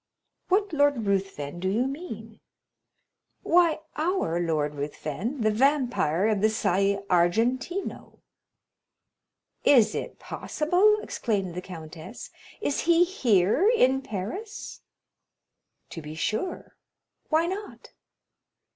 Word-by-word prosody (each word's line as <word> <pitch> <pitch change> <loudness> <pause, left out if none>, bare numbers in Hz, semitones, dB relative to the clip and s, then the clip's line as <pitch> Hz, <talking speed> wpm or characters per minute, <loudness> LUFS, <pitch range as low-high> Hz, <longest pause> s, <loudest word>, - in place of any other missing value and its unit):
"What 400 0 +1
Lord 285 -6 +2
Ruthven 190 -6 -2
do 185 +1 -1
you 225 +6 +1
mean?" 225 - -7 1.0
"Why, 335 -2 +3
our 310 - 0
Lord 155 -4 0
Ruthven—the 185 - -2
Vampire 240 - +2
of 215 -3 +1
the 215 - +4
Salle 200 -1 +1
Argentina!" 235 - 0 1.6
"Is 240 -7 +5
it - - -5
possible?" 360 +7 +1
exclaimed 195 -6 -2
the 180 - -4
countess; 165 +3 -9 0.3
"is 285 - 0
he 340 +1 +6
here 260 - +3
in 265 - +3
Paris?" 240 - -6 1.1
"To 165 - -6
be 150 +1 -8
sure,—why 315 - -3
not?" 390 +4 -6
225 Hz, 95 wpm, -26 LUFS, -, 1.6 s, he